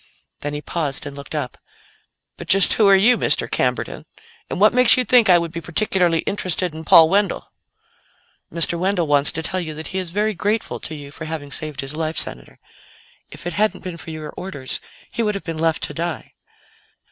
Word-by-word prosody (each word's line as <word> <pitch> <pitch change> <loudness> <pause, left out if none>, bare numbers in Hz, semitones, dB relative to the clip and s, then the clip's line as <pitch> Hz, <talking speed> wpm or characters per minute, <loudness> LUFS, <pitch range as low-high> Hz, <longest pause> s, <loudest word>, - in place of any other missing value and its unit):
Then 145 0 -4
he 145 - -6
paused 145 -5 -3
and 145 -1 -7
looked 140 +2 -8
up. 130 -5 -4 0.8
"But - - -10
just 195 -1 +5
who 215 - +4
are 195 - +7
you, 220 +6 +4
Mr. - - +1
Camberton? - - -2 0.4
And - - -4
what 210 +3 +5
makes 250 0 +6
you 255 - +1
think 235 -1 +5
I 180 - +8
would 170 -1 -2
be 170 0 -6
particularly 175 -2 +1
interested 185 -3 -2
in 160 +1 -8
Paul 160 +1 +8
Wendell?" 200 +2 0 1.0
"Mr. 170 +1 +3
Wendell 185 -1 +1
wants 145 -1 +3
to 160 - -3
tell 185 +3 -1
you 160 -4 -5
that 160 +1 -7
he 190 - -2
is 185 -2 -4
very 210 +4 0
grateful 210 +4 -2
to 155 - -7
you 145 -1 -10
for 155 +2 -8
having 155 -3 -6
saved 155 -1 -3
his 135 +2 -5
life, 160 0 -2
Senator. - - -3 0.7
If - - -11
it 175 - -3
hadn't 205 -2 0
been 180 -3 -6
for 165 - -10
your 155 -1 -7
orders, 145 -9 -4 0.3
he - - -2
would 210 -2 0
have 200 - -5
been 165 -2 -5
left 160 0 0
to - - -3
die." 170 -3 -4
170 Hz, 205 wpm, -21 LUFS, 155-195 Hz, 1.0 s, I